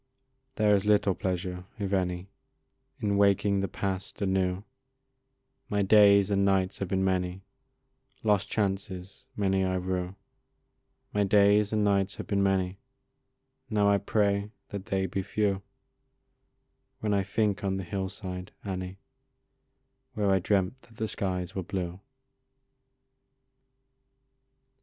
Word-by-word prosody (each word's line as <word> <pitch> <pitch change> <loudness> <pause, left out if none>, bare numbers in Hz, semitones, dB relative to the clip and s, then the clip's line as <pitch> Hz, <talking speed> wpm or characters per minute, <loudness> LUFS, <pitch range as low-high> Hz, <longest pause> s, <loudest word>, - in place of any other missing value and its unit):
There 105 -2 +4
is 100 -1 +3
little 105 -2 +3
pleasure, 90 0 -3
if 100 -2 -3
any, 90 0 -1 0.7
In 100 -1 +1
waking 100 0 +3
the 100 - 0
past 95 -1 -4
anew; 95 -1 0 1.1
My 100 -1 +1
days 100 0 +6
and 100 0 +3
nights 95 -1 +1
have 95 - -2
been 95 +1 0
many; 90 0 -1 0.8
Lost 105 -3 +2
chances 95 +1 -3
many 95 -2 +1
I 95 0 0
rue 90 0 -2 1.0
My 105 - +2
days 100 +1 +4
and 105 -1 +1
nights 100 -2 +2
have - - -6
been 100 -1 0
many; 95 -1 +1 0.9
Now 105 -1 +3
I 100 - +3
pray 100 0 +1 0.2
that 100 -1 -6
they 95 -1 0
be 95 +1 -2
few, 100 0 0 1.4
When 105 -1 0
I 100 - +3
think 100 0 0
on 95 -1 0
the 95 - -4
hill 95 +1 -3
side, 90 -2 -6
Annie, 95 -1 -4 1.2
Where 105 -2 +2
I 95 - +4
dreamt 100 +6 0
that 115 -1 -20
the 110 0 -2
skies 90 -3 -3
were 95 - -2
blue. 90 -1 -4
95 Hz, 130 wpm, -28 LUFS, 95-100 Hz, 1.4 s, days